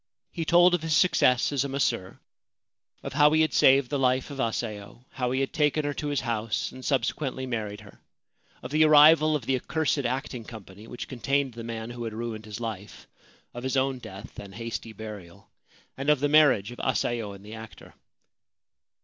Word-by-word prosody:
He 165 Hz, -2 st, -4 dB
told 175 Hz, +2 st, +5 dB
of 175 Hz, -, +1 dB
his 160 Hz, -1 st, 0 dB
success 130 Hz, -8 st, +3 dB
as 140 Hz, -2 st, 0 dB
a 140 Hz, -, -4 dB
masseur; 135 Hz, -9 st, -1 dB, 0.9 s
of -, -, -6 dB
how 150 Hz, +1 st, +5 dB
he 155 Hz, -, +4 dB
had 155 Hz, -, +1 dB
saved 135 Hz, -1 st, +4 dB
the 145 Hz, -, 0 dB
life 130 Hz, +2 st, +1 dB
of 140 Hz, -, -8 dB
Asayo, 110 Hz, -1 st, -4 dB
how 125 Hz, -1 st, -2 dB
he 130 Hz, +2 st, 0 dB
had 135 Hz, -, -2 dB
taken 150 Hz, -1 st, +1 dB
her 145 Hz, -, -1 dB
to 150 Hz, -, -4 dB
his 145 Hz, -2 st, -1 dB
house 115 Hz, -3 st, -2 dB
and 130 Hz, -, -11 dB
subsequently 130 Hz, 0 st, -1 dB
married 110 Hz, -5 st, -4 dB
her; -, -, -16 dB, 0.6 s
of 125 Hz, -, -7 dB
the 155 Hz, +1 st, +4 dB
arrival 155 Hz, +1 st, +6 dB
of 135 Hz, -6 st, -3 dB
the 135 Hz, -, +1 dB
accursed 155 Hz, +3 st, -1 dB
acting 130 Hz, -1 st, -3 dB
company 105 Hz, -1 st, -12 dB
which 120 Hz, -, -7 dB
contained 135 Hz, +1 st, -1 dB
the 115 Hz, 0 st, -8 dB
man 115 Hz, 0 st, -6 dB
who 120 Hz, 0 st, -6 dB
had 110 Hz, -, -5 dB
ruined 115 Hz, -1 st, -5 dB
his 105 Hz, +1 st, -7 dB
life; 110 Hz, -4 st, -7 dB, 0.5 s
of 120 Hz, -, -7 dB
his 130 Hz, +1 st, -1 dB
own 130 Hz, -1 st, 0 dB
death 95 Hz, -4 st, -10 dB
and 100 Hz, -2 st, -10 dB
hasty 115 Hz, 0 st, -5 dB
burial; 105 Hz, -5 st, -10 dB, 0.4 s
and 135 Hz, +2 st, -3 dB
of 150 Hz, -2 st, +4 dB
the 145 Hz, -, +1 dB
marriage 145 Hz, -9 st, +4 dB
of 120 Hz, -, -10 dB
Asayo 120 Hz, -5 st, -1 dB
and 100 Hz, +1 st, -13 dB
the 105 Hz, -, -10 dB
actor. 110 Hz, 0 st, -11 dB
125 Hz, 195 wpm, -26 LUFS, 110-145 Hz, 0.9 s, arrival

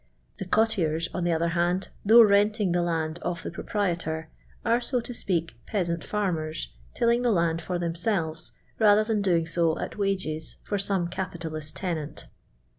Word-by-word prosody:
The 190 Hz, -, -3 dB
cot 220 Hz, +4 st, +3 dB
tiers, 165 Hz, -4 st, 0 dB
on 180 Hz, -, -2 dB
the 175 Hz, -, +2 dB
other 165 Hz, +1 st, +1 dB
hand, 175 Hz, +2 st, 0 dB
though 230 Hz, +3 st, +8 dB
renting 205 Hz, -1 st, +3 dB
the 175 Hz, 0 st, +2 dB
land 165 Hz, -1 st, -1 dB
of 175 Hz, -1 st, -3 dB
the -, -, -4 dB
proprietor, 170 Hz, -4 st, -2 dB, 0.3 s
are, 235 Hz, +1 st, +3 dB
so 250 Hz, +1 st, 0 dB
to 240 Hz, +1 st, -7 dB
speak, 170 Hz, -7 st, -2 dB
peasant 170 Hz, -5 st, -1 dB
fiinnen. 165 Hz, -7 st, -2 dB, 0.3 s
tilling 235 Hz, 0 st, +3 dB
the 245 Hz, -1 st, +2 dB
huid 170 Hz, -3 st, +1 dB
for 180 Hz, -, -2 dB
themselves 170 Hz, -1 st, -2 dB, 0.3 s
rather 215 Hz, -1 st, +5 dB
tlian 215 Hz, -2 st, 0 dB
doing 175 Hz, -4 st, +2 dB
so 165 Hz, 0 st, +1 dB
at -, -, -5 dB
wages 185 Hz, -6 st, -2 dB
for 205 Hz, -, -2 dB
some 195 Hz, -3 st, 0 dB
capitalist 165 Hz, -4 st, -5 dB
tenant. 160 Hz, -5 st, -4 dB
175 Hz, 165 wpm, -27 LUFS, 165-205 Hz, 0.3 s, though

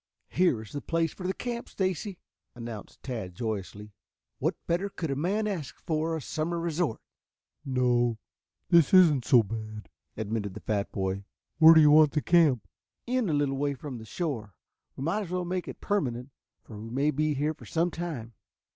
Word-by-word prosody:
"Here 170 Hz, -11 st, +2 dB
is 105 Hz, -, -13 dB
the 145 Hz, -, -4 dB
place 165 Hz, 0 st, 0 dB
for 185 Hz, -, -5 dB
the 190 Hz, -, 0 dB
camp, 240 Hz, -1 st, -4 dB
Stacy," 190 Hz, 0 st, -2 dB, 0.4 s
announced 115 Hz, -3 st, -8 dB
Tad 110 Hz, -9 st, -5 dB
joyously. 105 Hz, -1 st, -4 dB, 0.5 s
"What -, -, 0 dB
better 175 Hz, +4 st, 0 dB
could 165 Hz, -6 st, -4 dB
a -, -, 0 dB
man 195 Hz, +9 st, 0 dB
ask 170 Hz, -10 st, -4 dB
for 160 Hz, 0 st, -1 dB
a -, -, -6 dB
summer 170 Hz, +4 st, -2 dB
resort?" 165 Hz, -6 st, -1 dB, 0.6 s
"No, 125 Hz, -3 st, +2 dB, 0.5 s
this 170 Hz, +1 st, +6 dB
isn't 155 Hz, -9 st, +6 dB
so 120 Hz, -3 st, +6 dB
bad," 110 Hz, 0 st, -7 dB, 0.3 s
admitted 105 Hz, -2 st, -3 dB
the -, -, -6 dB
fat 100 Hz, -2 st, -1 dB
boy. 95 Hz, 0 st, -2 dB, 0.4 s
"Where 160 Hz, 0 st, +10 dB
do 160 Hz, -, +8 dB
you 150 Hz, -1 st, +7 dB
want 155 Hz, -1 st, +6 dB
the 150 Hz, -, +1 dB
camp?" 145 Hz, -, +4 dB, 0.4 s
"In 245 Hz, -4 st, 0 dB
a -, -, +1 dB
little 145 Hz, -2 st, +1 dB
way 140 Hz, 0 st, 0 dB
from 130 Hz, -2 st, -7 dB
the 110 Hz, -, -10 dB
shore. 115 Hz, -, -4 dB, 0.4 s
We 130 Hz, -, -5 dB
might 175 Hz, +8 st, 0 dB
as 195 Hz, -, -6 dB
well 180 Hz, 0 st, -2 dB
make 180 Hz, 0 st, -3 dB
it -, -, -8 dB
permanent, 135 Hz, -, -1 dB, 0.3 s
for 105 Hz, -3 st, -10 dB
we 110 Hz, +2 st, -7 dB
may 140 Hz, +5 st, +1 dB
be 150 Hz, +1 st, 0 dB
here 150 Hz, +3 st, 0 dB
some 170 Hz, +2 st, 0 dB
time." 150 Hz, -10 st, -5 dB
145 Hz, 180 wpm, -28 LUFS, 115-170 Hz, 0.6 s, Where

